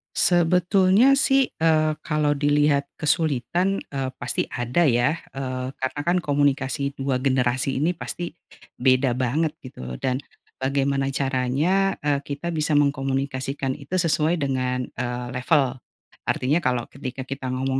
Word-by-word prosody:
Sebetulnya 185 +7 +4
sih, 270 -1 +3
eee, 155 -1 +3
kalau 150 -2 +1
dilihat 145 0 +2 0.2
kesulitan, 165 +5 +1
eee, 135 -2 -4
pasti 125 0 -1
ada 125 +8 0
ya, 135 +1 +3 0.2
eee, 130 -1 -4
karenakan 145 +7 0
komunikasi 140 -2 0
dua 135 -1 0
generasi 130 0 +1
ini 170 +5 +1
pasti, 175 0 -5 0.4
beda 130 0 +3
banget 145 +5 0
gitu 65 - -8
dan 130 0 0 0.4
bagaimana 135 0 0
caranya, 140 +9 +1
eee, 145 -1 +1
kita 145 +4 -4
bisa 155 -2 0
mengkomunikasikan 135 -1 0
itu 140 +6 -5
sesuai 165 -2 +2
dengan, 130 -4 -1 0.2
eee, 120 0 -3
level, 130 0 +1 0.5
artinya 145 +6 +1
kalau 125 -7 0
ketika 130 -1 -6
kita 135 0 -6
ngomong 130 +1 -1
140 Hz, 125 wpm, -24 LUFS, 130-160 Hz, 0.5 s, Sebetulnya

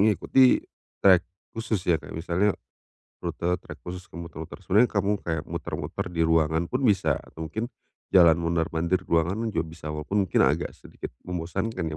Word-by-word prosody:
ngikuti 110 +5 +4 0.4
trek 95 -3 +8 0.3
khusus 110 -4 -2
ya 85 -2 +3
kayak 75 - -10
misalnya 90 +5 +1 0.7
rute 85 - -3 0.2
trek - - -10
khusus 90 +1 -5
ke - - -11
muter-muter. 80 -2 -8
Sebenernya 110 +5 +4
kamu 100 0 0
kayak 80 -3 -2
muter-muter - - -4
di 85 -1 0
ruangan 80 +1 +2
pun 125 +7 -2
bisa 95 - +3
atau 80 0 -8
mungkin 110 - -4 0.4
jalan 85 -3 +7
mondar-mandir 85 +2 0
ruangan 90 +8 +1
juga 80 -6 -1
bisa 80 -1 -11
walaupun 95 +6 -1
mungkin - - +2
agak 75 +6 +1
sedikit - - -9
membosankan 90 +2 -3
ya 80 -1 -3
85 Hz, 160 wpm, -26 LUFS, 80-100 Hz, 0.7 s, trek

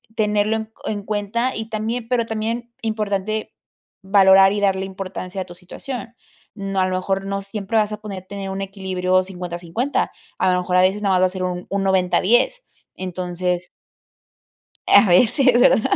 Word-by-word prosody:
tenerlo 210 0 +1
en 220 0 -6
en 205 -1 -2
cuenta 215 +5 -1
y 220 0 -4
también 225 +2 -3
pero 240 -1 +1
también 230 +2 -3
importante 215 -1 -2 0.5
valorar 195 0 +6
y 205 - -1
darle 190 -1 +1
importancia 190 0 -6
a - - -4
tu 175 - -11
situación. 235 +6 -8 0.4
No 195 -2 -3
a - - +3
lo 185 - -1
mejor 195 +1 -2
no 195 0 -2
siempre 200 +2 -3
vas 215 -1 +2
a - - -4
poder 195 -3 -7
tener 200 -1 -5
un 195 +1 -4
equilibrio 185 -1 0
50, 180 -2 -6
50. 180 +11 -1 0.3
A 185 - +2
lo 180 - +2
mejor 180 0 -1
a 180 - +6
veces 190 +3 +2
nada 195 -2 +2
más 180 - +3
va - - +6
a - - -5
ser 185 0 -6
un 180 0 -3
un 200 0 -1
90, 190 -2 +2
10. - - +2 0.3
Entonces. 180 -1 -3 1.2
A 200 +1 +7
veces, 245 - +4
¿verdad? 225 - +5
195 Hz, 180 wpm, -21 LUFS, 185-220 Hz, 1.2 s, A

